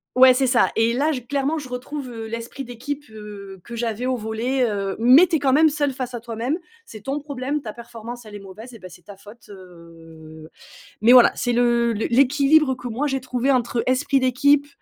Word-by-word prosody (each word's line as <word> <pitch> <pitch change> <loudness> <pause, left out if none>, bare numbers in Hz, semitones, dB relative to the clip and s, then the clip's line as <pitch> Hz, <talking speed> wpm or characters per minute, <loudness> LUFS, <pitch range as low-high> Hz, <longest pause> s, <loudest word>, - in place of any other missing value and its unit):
Ouais 255 0 +7
c'est 265 +1 +1
ça, 245 -1 +3
et 225 +1 +2
là 290 +5 +1
j 255 -5 -5
clairement 280 +4 -1
je 290 -4 -7
retrouve, 255 +3 -6
heu, 225 -2 -7
l'esprit 230 +4 -6
d'équipe, 270 +4 -6
heu, 205 -3 -10
que 235 - -9
j'avais 230 0 -3
au 255 0 0
volley, 235 +4 -2
heu, 200 -4 -2
mais 255 +9 +7
tu 320 - +1
es - - -6
quand 270 -2 +1
même 315 +2 +5
seule 290 -1 -1
face 255 -1 -6
à 240 - -4
toi-même, 235 +6 -3 0.3
c'est 215 - -12
ton 275 +7 -3
problème. 285 0 -4
Ta 215 - -6
performance 235 0 -10
elle 210 -1 -11
est - - -7
mauvaise 210 +5 -12
et - - -13
beh, 185 - -11
c'est 180 - -15
ta 200 +2 -13
faute 210 +3 -16
heu, 165 -4 -14 0.6
mais 235 +3 +6
voilà, 250 -2 +8
c'est 245 - -1
le 235 -1 +2
les 220 0 -2
l'équilibre 275 +3 +3
que 245 -1 -8
moi 255 +6 -2
j'ai 270 -1 -1
trouvé 255 +1 -1
entre, 240 -1 -1
heu, - - -2
esprit 265 +2 +1
d'équipe, 280 +3 +2
245 Hz, 225 wpm, -22 LUFS, 220-270 Hz, 0.6 s, voilà